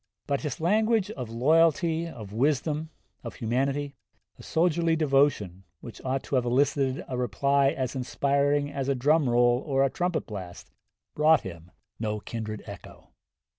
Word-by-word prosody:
But 140 -2 -1
his 150 -5 -4
language 215 +4 +2
of 125 - -6
loyalty, 160 +6 +2
of 110 -10 -9
wisdom, 150 +5 0 0.3
of - - -7
humanity, 135 +4 -1 0.5
of - - -12
soldierly 165 0 +1
devotion, 135 - +1 0.2
which 115 - -11
ought 130 +1 -2
to - - -10
have 125 - 0
elicited 135 +1 +1
a 130 - -4
reply 135 +4 +2
as 135 -3 -3
inspiring 140 +2 0
as 140 -1 -3
a 140 - +2
drum 145 +2 +2
roll 120 +1 +3
or 135 -2 +1
a 135 - +1
trumpet 180 -1 -1
blast, 95 -5 -9 0.4
brought 155 +1 +4
him 85 -2 -9 0.3
no 105 -1 -2
kindred 110 0 -6
echo. 100 -3 -12
140 Hz, 150 wpm, -27 LUFS, 120-155 Hz, 0.5 s, brought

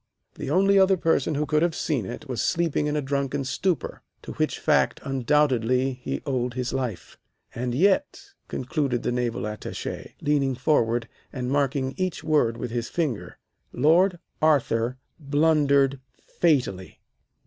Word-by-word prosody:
The - - -6
only 195 +1 +4
other 190 0 +5
person 165 -2 +1
who 150 +1 0
could 150 +1 +1
have 170 -1 +1
seen 130 - -1
it 150 - -7
was 125 -4 -2
sleeping 165 -3 0
in 150 - -1
a 150 - -1
drunken 140 0 -1
stupor, 165 +5 -2 0.2
to - - -7
which - - -1
fact - - +2
undoubtedly 130 -2 +1
he - - -4
owed 125 -3 -1
his 125 -1 -2
life. 125 -8 -4 0.3
And 120 0 -3
yet," 240 - +1 0.2
concluded 130 -1 -2
the - - 0
Naval 120 -2 -1
Attache, 105 0 -6
leaning 140 -3 +1
forward 120 -4 +1 0.2
and 125 -1 -4
marking 135 -1 0
each 185 -2 -2
word 120 -7 +2
with 125 - -5
his 120 -1 -3
finger, 150 -10 -3 0.3
"Lord 175 +7 +3 0.2
Arthur 130 -5 +2 0.2
blundered 140 -2 +2 0.2
fatally. 125 - -1
140 Hz, 145 wpm, -25 LUFS, 125-155 Hz, 0.3 s, other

